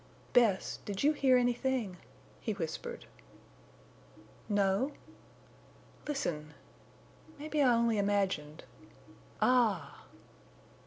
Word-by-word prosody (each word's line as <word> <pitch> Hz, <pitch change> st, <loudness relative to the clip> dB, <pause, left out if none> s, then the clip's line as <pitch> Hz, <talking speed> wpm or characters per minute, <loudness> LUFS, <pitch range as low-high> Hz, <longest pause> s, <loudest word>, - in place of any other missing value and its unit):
"Bess, 220 Hz, -6 st, +3 dB
did 200 Hz, +2 st, -4 dB
you 300 Hz, +2 st, +5 dB
hear 265 Hz, -3 st, +4 dB
anything?" 245 Hz, -5 st, 0 dB, 0.4 s
he 220 Hz, -, -2 dB
whispered. 165 Hz, -6 st, -5 dB, 1.4 s
"No." 205 Hz, +7 st, +1 dB, 1.1 s
"Listen!... 150 Hz, -, -3 dB, 0.8 s
Maybe 300 Hz, +1 st, -1 dB
I 260 Hz, -3 st, +5 dB
only 230 Hz, -2 st, +2 dB
imagined—_Ah! 185 Hz, -, -1 dB
210 Hz, 70 wpm, -32 LUFS, 185-255 Hz, 1.4 s, you